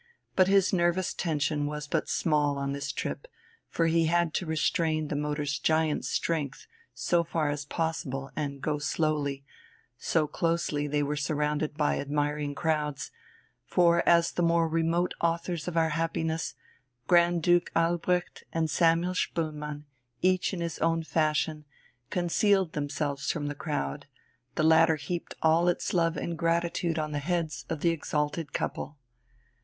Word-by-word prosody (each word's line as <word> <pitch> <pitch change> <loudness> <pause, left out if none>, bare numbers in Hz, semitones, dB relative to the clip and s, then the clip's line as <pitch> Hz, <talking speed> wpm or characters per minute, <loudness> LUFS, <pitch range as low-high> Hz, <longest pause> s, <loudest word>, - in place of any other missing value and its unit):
But 185 -1 +5
his 195 0 +4
nervous 175 0 +1
tension 150 -3 -1
was 150 0 -4
but 160 +1 -1
small 150 -3 +1
on 140 0 -2
this 140 0 -3
trip, - - -4 0.4
for 165 - +1
he 165 0 +3
had 170 0 +2
to 180 - -2
restrain 155 -1 0
the - - -2
motor's 145 0 -1
giant 160 -1 +1
strength 150 -4 -2 0.3
so 170 -1 +1
far 160 -2 -1
as 145 -1 -4
possible 145 -4 -3
and 140 -3 -4
go 150 -1 0
slowly 145 -2 -1 0.5
so 160 -2 +1
closely 165 -2 -1 0.2
were 145 +1 -1
they - - -3
surrounded 150 +1 -1
by 150 - +1
admiring 145 0 -1
crowds; 150 -3 -1 0.5
for 170 -1 +3
as 170 -1 +5
the - - -2
more 170 -1 +3
remote 165 +2 +1
authors 170 0 -1
of 170 -1 -2
our 160 -1 +3
happiness, 160 0 -1 0.5
Grand 175 -1 +4
Duke 175 +1 +3
Albrecht 175 +2 0
and 160 -2 0
Samuel 170 +2 +3
Spoelmann, 150 -4 -3 0.4
each 185 0 +3
in 185 -3 -4
his 170 -2 -3
own 165 0 +1
fashion, 155 -1 0 0.5
concealed 185 0 +2
themselves 145 -1 -2
from 150 -4 -3
the 145 - -2
crowd, 145 - -3 0.5
the 155 - +1
latter 160 +1 +5
heaped 160 +4 -5
all 165 +2 +4
its 175 - 0
love 165 -2 +2
and 170 -2 -4
gratitude 170 0 0
on 155 -1 -2
the 145 - -1
heads 155 -4 -2
of 160 -3 -3
the 170 - +3
exalted 150 -1 -2
couple. 145 - -3
160 Hz, 150 wpm, -28 LUFS, 150-170 Hz, 0.5 s, But